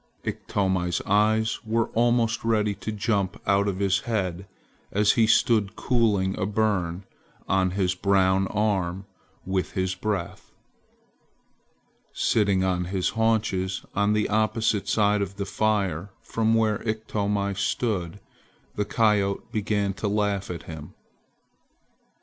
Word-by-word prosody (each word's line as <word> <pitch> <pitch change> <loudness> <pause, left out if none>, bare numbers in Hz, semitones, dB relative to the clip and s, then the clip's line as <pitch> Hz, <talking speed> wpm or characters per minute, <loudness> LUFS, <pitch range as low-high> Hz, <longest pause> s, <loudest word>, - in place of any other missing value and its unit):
Iktomi's 95 -3 -1
eyes 110 +2 +2
were 115 0 0
almost 120 -1 +1
ready 105 -2 +1
to 110 - -6
jump 100 -2 -1
out 100 0 +2
of 95 -2 -1
his 95 -1 +2
head 95 -5 -3 0.4
as 105 +1 +3
he 115 -2 +3
stood 110 -2 +3
cooling 105 -6 +1
a 95 - 0
burn 100 -4 0 0.4
on 95 -1 +2
his 90 -2 +1
brown 95 0 +2
arm 95 -3 -1 0.4
with 95 -1 -2
his 95 -2 -1
breath. 95 -1 -4 1.6
Sitting 100 -4 +2
on 90 -1 0
his 95 0 -1
haunches, 105 -4 0
on 105 +1 +2
the 105 0 +1
opposite 110 -1 +1
side 105 0 +2
of 100 0 -3
the 100 0 -3
fire 100 -5 0
from 115 0 +1
where 110 -2 +1
Iktomi 105 -2 -1
stood, 95 -2 -2 0.5
the 105 - -1
coyote 105 -2 +1
began 105 -2 0
to 105 - -3
laugh 100 -1 0
at 85 -2 -5
him. 80 -2 -9
100 Hz, 125 wpm, -25 LUFS, 95-110 Hz, 1.6 s, as